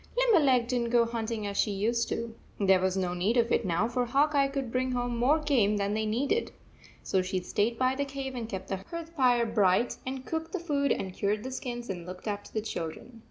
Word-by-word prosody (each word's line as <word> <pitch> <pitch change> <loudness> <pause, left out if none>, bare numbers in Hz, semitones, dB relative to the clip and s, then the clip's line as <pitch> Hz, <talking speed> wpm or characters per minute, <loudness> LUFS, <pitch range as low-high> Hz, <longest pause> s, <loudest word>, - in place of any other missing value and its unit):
Limberleg 305 - +4
did 250 0 0
n 235 - 0
t - - -3
go 235 0 +4
hunting 230 -2 -3
as 200 0 -4
she - - +2
used 225 +4 0
to. 230 -1 -3 0.3
There 190 -2 +5
was 190 0 0
no 180 -2 0
need 195 +7 +1
of 235 0 +2
it - - +2
now, 185 +3 +1
for 245 +1 0
Hawk 290 +5 +2
Eye 280 -1 +4
could 275 -3 -4
bring 255 +1 0
home 245 -1 -1
more 255 +6 +3
game 250 -10 +2
than 200 0 0
they 215 0 0
needed. 275 - 0 0.5
So 190 - +1
she 185 0 -2
stayed 210 +5 0
by 255 +1 +2
the 280 +2 -1
cave 275 -1 -5
and 235 -3 -5
kept 190 -2 -6
the 195 - -1
hearth 330 - -7
fire 245 -4 +4
bright 210 0 +2
and 260 0 -5
cooked 320 0 -4
the 380 - -1
food 285 -4 0
and 190 -1 -1
cured 205 +3 -1
the 260 - -5
skins 240 -2 -5
and 175 -2 -5
looked 185 +3 -8
after 205 -1 -4
the 215 - -1
children. 215 +5 -6
235 Hz, 240 wpm, -29 LUFS, 205-265 Hz, 0.5 s, There